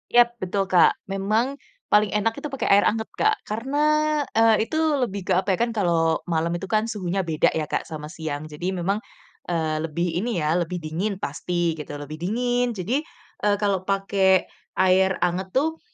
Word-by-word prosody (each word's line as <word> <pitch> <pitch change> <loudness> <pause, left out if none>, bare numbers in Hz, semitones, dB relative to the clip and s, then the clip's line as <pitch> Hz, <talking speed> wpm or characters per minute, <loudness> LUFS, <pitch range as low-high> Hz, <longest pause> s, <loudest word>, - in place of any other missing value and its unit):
Yap 240 0 +6
betul, 195 +2 0
Kak. 180 -2 +4
Memang 215 +7 0 0.4
paling 210 -1 +4
enak 225 +2 +1
itu 300 - -4
pakai 270 - -2
air 200 +1 +6
anget 220 +1 -1
Kak 435 0 +4
karena, 265 +8 -1 0.5
eee, 225 0 +4
itu 315 - -3 0.2
lebih 200 -5 -2
ke, 190 - +3
apa 190 0 +1
ya, - - -10
kan 235 0 +1
kalau 170 -5 +1
malam 165 0 0
itu 190 +2 -5
kan 220 +1 +2
suhunya 195 -4 -2
beda 160 -2 +2
ya 155 -2 -2
Kak - - -1
sama 150 -1 -7
siang. 155 -3 -5
Jadi 155 +5 -4
memang, 190 +4 0 0.5
eee, 160 -3 -1
lebih 165 +2 -1
ini 225 -1 -1
ya 155 +1 +1
lebih 175 +1 -2
dingin 185 +6 -2
pasti 170 +1 -1
gitu, 150 -2 -7
lebih 145 +1 -7
dingin 245 +5 0
jadi, 230 - -1 0.4
eee, 205 -1 +3
kalau 200 -3 0
pakai 195 -1 +2 0.3
air 190 0 +3
anget 185 +2 -1
tuh 320 +4 +1
190 Hz, 180 wpm, -24 LUFS, 170-220 Hz, 0.5 s, Yap